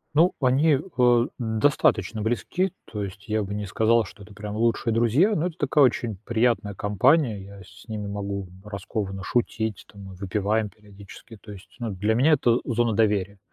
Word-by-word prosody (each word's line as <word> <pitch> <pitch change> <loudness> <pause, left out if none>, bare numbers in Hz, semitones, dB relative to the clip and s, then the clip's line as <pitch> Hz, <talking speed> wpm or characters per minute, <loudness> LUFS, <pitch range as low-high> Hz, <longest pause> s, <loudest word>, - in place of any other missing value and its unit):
Ну, 170 +4 +5
они, 140 +3 +3 0.2
а, 120 -1 +5
достаточно 110 -1 +1
близки, 120 - -1 0.2
то 105 -2 -4
есть 100 +3 -8
я 110 -1 0
бы 100 +1 -5
не 105 0 -3
сказал, 110 +3 +2
что 100 - -13
это 105 0 -14
прям 105 0 -6
лучшие 115 0 +1
друзья, 130 - +3
но 165 +3 0
это 170 -1 -8
такая 145 0 +3
очень 120 -4 +1
приятная 115 -3 +1
компания. 105 - +2
Я 100 0 -12
с - - -16
ними 105 -2 -4
могу 100 -1 -4 0.2
раскованно 100 -1 -5
шутить, 110 -4 -1
там, 100 -1 -12
мы 95 -1 -10
выпиваем 105 +3 -1
периодически. 105 +2 -14
То 105 0 -13
есть, 95 -2 -11
ну, 115 - -3
для 105 +4 0
меня 140 +6 +4
это 120 -5 +3
зона 120 -2 0
доверия, 100 -2 +1
110 Hz, 175 wpm, -25 LUFS, 100-120 Hz, 0.2 s, Ну